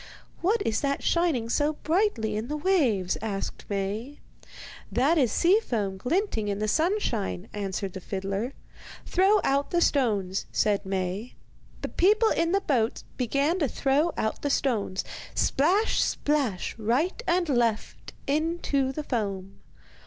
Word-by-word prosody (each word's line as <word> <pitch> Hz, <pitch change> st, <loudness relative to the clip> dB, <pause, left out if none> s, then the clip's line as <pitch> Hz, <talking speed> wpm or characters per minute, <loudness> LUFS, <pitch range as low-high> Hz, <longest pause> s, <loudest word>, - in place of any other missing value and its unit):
'What 405 Hz, +4 st, +2 dB
is 220 Hz, -, 0 dB
that 280 Hz, -1 st, -1 dB
shining 330 Hz, -10 st, +1 dB
so 295 Hz, +6 st, +1 dB
brightly 310 Hz, -, +1 dB
in 215 Hz, +2 st, -3 dB
the 300 Hz, -, -3 dB
waves?' 270 Hz, -, +1 dB
asked 205 Hz, -3 st, -4 dB
Maie. 205 Hz, +8 st, -3 dB, 0.7 s
'That 290 Hz, +7 st, +3 dB
is 250 Hz, -6 st, +3 dB
sea 365 Hz, -, +4 dB
foam 205 Hz, -, -2 dB
glinting 250 Hz, -, -1 dB
in 200 Hz, -1 st, -1 dB
the 215 Hz, +1 st, -1 dB
sunshine,' 310 Hz, -, 0 dB
answered 195 Hz, -2 st, -3 dB
the 190 Hz, -, -7 dB
fiddler. 195 Hz, +7 st, -3 dB, 0.5 s
'Throw 390 Hz, +3 st, +4 dB
out 280 Hz, +1 st, +1 dB
the 345 Hz, -, +1 dB
stones,' 210 Hz, -, +1 dB
said 205 Hz, -2 st, +1 dB
Maie. 190 Hz, +4 st, -3 dB, 0.5 s
The -, -, -2 dB
people 430 Hz, +5 st, +3 dB
in 335 Hz, 0 st, +1 dB
the 395 Hz, +1 st, +2 dB
boat 240 Hz, -, 0 dB
began 280 Hz, +8 st, +1 dB
to 295 Hz, -, +2 dB
throw 280 Hz, +7 st, +1 dB
out 220 Hz, -, -1 dB
the 285 Hz, -, -1 dB
stones, 220 Hz, -9 st, 0 dB, 0.3 s
splash, 370 Hz, +11 st, +2 dB
splash, 275 Hz, -11 st, 0 dB
right 260 Hz, -, 0 dB
and 350 Hz, 0 st, +2 dB
left, 235 Hz, -5 st, -1 dB
into 290 Hz, -2 st, 0 dB
the 300 Hz, +3 st, -4 dB
foam. 200 Hz, -7 st, -3 dB
260 Hz, 140 wpm, -27 LUFS, 210-330 Hz, 0.7 s, sea